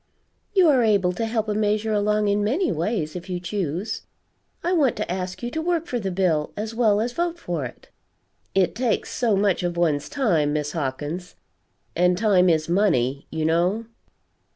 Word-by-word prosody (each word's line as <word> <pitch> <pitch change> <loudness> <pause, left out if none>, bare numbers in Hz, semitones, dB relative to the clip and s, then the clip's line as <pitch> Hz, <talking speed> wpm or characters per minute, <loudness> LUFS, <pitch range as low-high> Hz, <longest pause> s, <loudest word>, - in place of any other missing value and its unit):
You 370 -3 +6
are 275 -5 +5
able 200 -5 +3
to 225 +5 -2
help 220 -1 -1
a 210 - 0
measure 215 +1 0
along 210 0 +1
in 205 0 +2
many 280 - +1
ways, 165 -1 -2
if 180 +1 -7
you 180 -1 -2
choose. 180 +1 -3 0.6
I 350 +2 +1
want 285 -9 +3
to - - -3
ask 180 +3 -4
you 240 - -3
to 320 - -2
work 335 -1 0
for 250 -8 -2
the 195 -3 -2
bill 175 -5 0
as 215 +2 -4
well 220 -3 +3
as 240 +2 -2
vote 345 +2 -1
for 170 - -3
it." 120 - -11 0.7
"It 190 -3 +3
takes 240 0 -1
so 230 -4 +1
much 195 -1 +2
of 175 -1 -2
one's 155 -4 +1
time, 180 - +1
Miss 150 -1 -1
Hawkins 155 +4 -4 0.6
and 180 +1 +3
time 190 -4 +4
is 160 -2 +2
money, 140 - +1
you 160 -1 -2
know." 175 +8 +1
195 Hz, 185 wpm, -24 LUFS, 170-225 Hz, 0.7 s, You